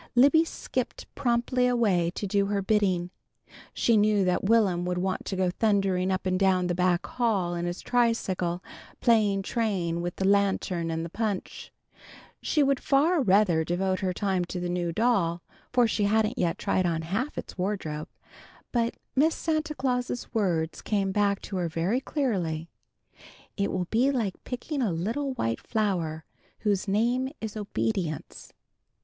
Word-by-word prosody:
Libby 285 +6 +6
skipped 255 -6 -4
promptly 250 -1 +1
away 205 -9 +2
to - - -3
do 200 0 +1
her 200 -1 -1
bidding. 190 -4 +1 0.6
She 235 - +2
knew 205 -2 +3
that 180 -1 +1
Will'm 200 -5 +3
would 180 0 -1
want 185 +1 -2
to 195 - -3
go 185 -1 +1
thundering 195 -2 +1
up 185 0 -1
and 185 0 +1
down 190 -2 +3
the 175 - 0
back 180 0 +1
hall 205 -8 0
in 175 0 -2
his 175 +1 -4
tricycle, 190 -7 0 0.4
playing 210 -5 +3
train 190 -7 -1
with 175 0 -3
the 190 - -2
lantern 195 -4 +1
and 165 0 -2
the - - -6
punch. 210 -3 -3 0.7
She 300 - +2
would 275 -1 +2
far 300 +4 +3
rather 190 -7 +3
devote 185 +3 0
her 190 -2 0
time 190 -1 0
to 180 +1 -5
the 175 0 -3
new 175 -1 -1
doll, 175 -5 +1 0.3
for 245 -2 +4
she 210 -1 0
hadn't 220 +3 +1
yet 170 -2 +1
tried 185 -1 +1
on 165 -1 -1
half 220 - -2
its - - -6
wardrobe. 180 -6 -3 0.6
But 235 -1 0 0.2
Miss 310 +4 +3
Santa 310 -1 -1
Claus's 250 -2 -2
words 170 -7 0
came 195 -2 0
back 200 0 +1
to 195 - -4
her 175 -2 -1
very 175 +10 0
clearly: 180 - -2 0.8
"_It 200 -1 0
will 185 -1 -2
be 245 +5 +3
like 230 -9 -2
picking 270 +3 -3
a 220 -6 +1
little 230 - -2
white 115 - -1
flower 175 -8 -1 0.4
whose 205 -2 0
name 240 +6 +1
is 220 -1 -5
obedience! 200 -6 -3
200 Hz, 160 wpm, -27 LUFS, 180-235 Hz, 0.8 s, Libby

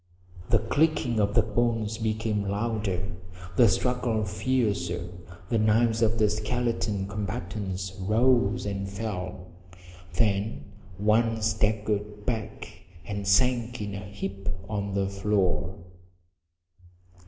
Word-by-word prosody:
The 115 - +5
clicking 120 0 +1
of 105 0 +1
the 115 - +6
bones 110 0 0
became 110 -1 0
louder, 100 -3 -1 0.4
the 120 - +7
struggle 120 +1 +1
fiercer, 100 -6 0 0.4
the 115 - +2
knives 110 +1 +3
of 115 0 +3
the 110 -1 +4
skeleton 105 -2 -1
combatants 100 -2 -4
rose 115 +2 +3
and 100 -1 -3
fell. 90 -3 -5 0.6
Then 105 -1 0 0.3
one 110 +2 +2
staggered 105 -1 0
back 110 -5 -4 0.2
and 100 -1 -4
sank 120 +3 +3
in 105 -2 -4
a 100 - -4
heap 100 0 -5 0.2
on 100 -2 -2
the 100 -1 +1
floor. 95 -4 0
105 Hz, 110 wpm, -27 LUFS, 100-115 Hz, 0.6 s, the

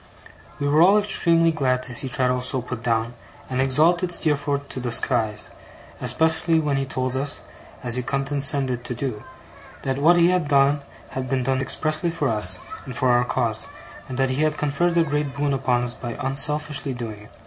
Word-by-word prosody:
We 145 - -1
were 150 +2 +4
all 195 +4 +6
extremely 170 -5 +3
glad 130 -5 0
to 125 - -3
see 130 +2 0
Traddles 125 -2 0
so 130 -4 0
put 125 -2 -6
down, 115 -1 0 0.4
and 130 0 0
exalted 165 +7 +3
Steerforth 145 -3 -1
to - - -5
the 125 -1 -3
skies: 115 -3 0 0.5
especially 160 +1 +2
when 145 -3 0
he 135 0 -2
told 130 0 -3
us, 140 +2 -3 0.4
as 120 0 0
he - - 0
condescended 135 -1 +1
to 125 - -4
do, 120 -4 -4 0.6
that 135 0 -2
what 170 +4 +5
he 170 0 +5
had 180 -4 +1
done 140 0 +3 0.3
had 130 -1 -4
been 130 -1 0
done 130 +1 0
expressly 155 +5 0
for 165 -4 -1
us, 105 -5 +4 0.3
and 130 - -8
for 130 -1 +1
our 120 0 +4
cause; 120 -3 -1 0.4
and 130 - -5
that 135 -1 +1
he 130 +3 -1
had 155 0 +1
conferred 170 +4 0
a 170 - +5
great 145 -2 -2
boon 140 0 0
upon 125 -2 +1
us 120 -1 -3
by 120 -2 -7
unselfishly 145 0 0
doing 115 -4 -6
it. - - -19
135 Hz, 190 wpm, -23 LUFS, 125-150 Hz, 0.6 s, all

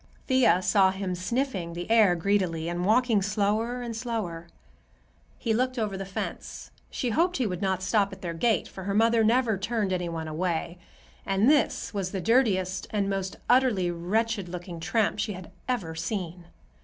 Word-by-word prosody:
Thea 255 -8 +4
saw 190 0 +4
him 190 -1 -3
sniffing 185 -2 -2
the 175 +1 -5
air 215 -6 +5
greedily 175 -3 0
and 175 +1 -2
walking 230 -1 +3
slower 215 +5 0
and 235 -1 -5
slower. 215 -8 -4 0.9
He 230 -3 -1
looked 255 +3 0
over 210 -4 -1
the 195 0 -5
fence. 195 - -6 0.2
She 245 - -2
hoped 350 +9 +2
he 255 - 0
would 180 -4 -3
not 190 -1 0
stop 200 -1 +2
at 190 - -11
their 170 -1 -3
gate, 210 +3 +1
for 190 - -9
her 200 0 -1
mother 225 +1 +4
never 225 -2 +2
turned 210 -2 -1
any 180 -1 -2
one 165 -1 -4
away, 170 +1 -2 0.4
and 195 +3 +2
this 290 -5 +2
was 195 -3 -2
the 195 - -1
dirtiest 190 -4 +1
and 200 -2 -1
most 190 -1 -3
utterly 240 -9 +3
wretched 200 +3 -1
looking 175 -1 -7
tramp 205 +5 0
she 210 0 -1
had 185 -2 -10 0.2
ever 200 -11 -1
seen. 175 +1 -4
195 Hz, 175 wpm, -27 LUFS, 180-230 Hz, 0.9 s, air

